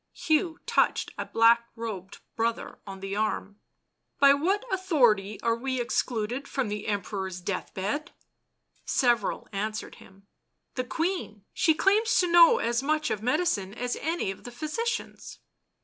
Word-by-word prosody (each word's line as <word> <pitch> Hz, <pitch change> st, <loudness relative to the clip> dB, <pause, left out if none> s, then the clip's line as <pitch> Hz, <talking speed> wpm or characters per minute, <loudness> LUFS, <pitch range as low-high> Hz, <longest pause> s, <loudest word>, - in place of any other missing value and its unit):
Hugh 320 Hz, +1 st, +1 dB
touched -, -, +1 dB
a -, -, -5 dB
black 235 Hz, +1 st, +4 dB
robed 215 Hz, -5 st, -6 dB
brother 230 Hz, 0 st, -2 dB
on 195 Hz, -1 st, -8 dB
the 195 Hz, 0 st, -4 dB
arm. 210 Hz, -1 st, -2 dB, 0.3 s
" -, -, -52 dB
By 280 Hz, 0 st, +8 dB
what 380 Hz, -, 0 dB
authority 240 Hz, -, +2 dB
are 230 Hz, 0 st, +2 dB
we 260 Hz, +2 st, -3 dB
excluded 240 Hz, +1 st, -1 dB
from 265 Hz, -5 st, -2 dB
the 210 Hz, 0 st, -4 dB
Em 205 Hz, -3 st, 0 dB
peror's 190 Hz, -2 st, -5 dB
death 185 Hz, +1 st, -4 dB
bed?" 220 Hz, -, -3 dB, 0.7 s
Several 240 Hz, -5 st, +1 dB
answered 215 Hz, +2 st, -4 dB
him: 195 Hz, +1 st, -18 dB, 0.2 s
" -, -, -52 dB
The 255 Hz, -, -2 dB
Queen! 320 Hz, -, -3 dB
she 320 Hz, -2 st, +3 dB
claims 425 Hz, +6 st, +3 dB
to 365 Hz, -, +4 dB
know 345 Hz, -1 st, +7 dB
as 235 Hz, +1 st, 0 dB
much 305 Hz, +2 st, 0 dB
of 210 Hz, -, -2 dB
medicine 245 Hz, -, 0 dB
as 245 Hz, 0 st, -2 dB
any 325 Hz, -, -1 dB
of 195 Hz, -, -11 dB
the -, -, -7 dB
physicians." 310 Hz, -, -4 dB
235 Hz, 155 wpm, -27 LUFS, 205-310 Hz, 0.7 s, By